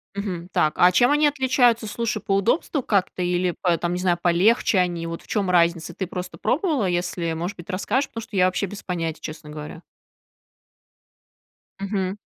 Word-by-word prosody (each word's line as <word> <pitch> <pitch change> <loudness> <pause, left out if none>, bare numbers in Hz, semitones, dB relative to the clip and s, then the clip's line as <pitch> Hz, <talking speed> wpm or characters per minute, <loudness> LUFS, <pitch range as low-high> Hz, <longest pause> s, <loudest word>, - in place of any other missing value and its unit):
Мгм. 185 -4 -4
Так, 155 - +2
а 180 - +6
чем 245 +7 +4
они 295 +1 +4
отличаются, 255 -5 +2
слушай, 215 0 -2
по 195 - 0
удобству 250 - +1
как-то 190 -4 0
или 175 0 0
по 175 -2 +3
там 175 +1 -2
не 180 - -2
знаю, 180 -1 +1
полегче 195 +6 +3
они? 175 -2 0
Вот 165 0 -6
в - - -21
чём 200 -4 -1
разница? 170 -1 +2
Ты 190 - -3
просто 180 0 -6
пробовала, 295 - 0
если, 175 -2 -1
может 170 +4 -4
быть, 175 +3 -12
расскажешь, 210 +8 -1
потому 230 - -6
что 215 - -10
я 185 -1 +4
вообще 185 +2 0
без 205 +2 -9
понятия, 165 -3 -3
честно 155 -1 -8
говоря. 150 +2 -8 2.0
Мгм. 195 -1 -2
185 Hz, 180 wpm, -23 LUFS, 175-215 Hz, 2.0 s, а